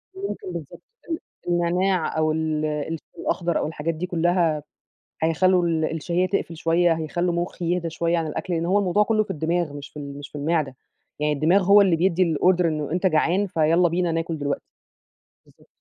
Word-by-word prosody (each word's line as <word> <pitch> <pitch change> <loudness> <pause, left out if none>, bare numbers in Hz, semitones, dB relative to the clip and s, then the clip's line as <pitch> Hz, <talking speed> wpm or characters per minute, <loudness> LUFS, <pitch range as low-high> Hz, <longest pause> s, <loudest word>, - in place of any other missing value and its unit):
ممكن 395 0 -5
بالضبط - - -8 0.3
ال 325 - -2 0.3
النعناع 175 0 +1
أو 155 0 +2
ال 155 -1 -1
الشاي 155 +1 -3 0.2
الأخضر 170 -2 -1
أو - - -1
الحاجات 160 +1 -3
دي 165 +3 -4
كلّها 170 -3 +1 0.6
هيخلّوا 180 +3 +3
ال 160 -2 +1
الـشهيّة 170 +3 -1
تقفل 175 -3 -2
شوية، 165 +1 +3
هيخلّوا 170 +2 -1
مُخّي 175 +1 -3
يهدى 170 -2 -2
شوية 170 +1 0
عن 165 -1 -1
الأكل 175 +4 -4
لإن 165 0 0
هو 190 +4 +3
الموضوع 200 +1 +2
كلّه 215 0 +2
في - - -6
الدماغ 160 0 -1
مش 145 -1 -8
في - - -13
ال 140 -1 -7
مش 145 0 -9
في - - -14
المعدة، 150 -3 0 0.4
يعني 150 0 +1
الدماغ 165 +7 +3
هو 200 +2 +7
اللي 190 -4 +4
بيدّي 170 -1 +2
الorder 180 +2 +3
إنه 150 -3 -1
أنت 180 +3 -1
جعان 180 +4 +2
فيالّا 165 +1 +3
بينا 175 0 0
ناكل 165 0 -2
دلوقتي. 140 -1 -2 0.8
بالضبط. - - -24
170 Hz, 185 wpm, -24 LUFS, 155-180 Hz, 0.8 s, هو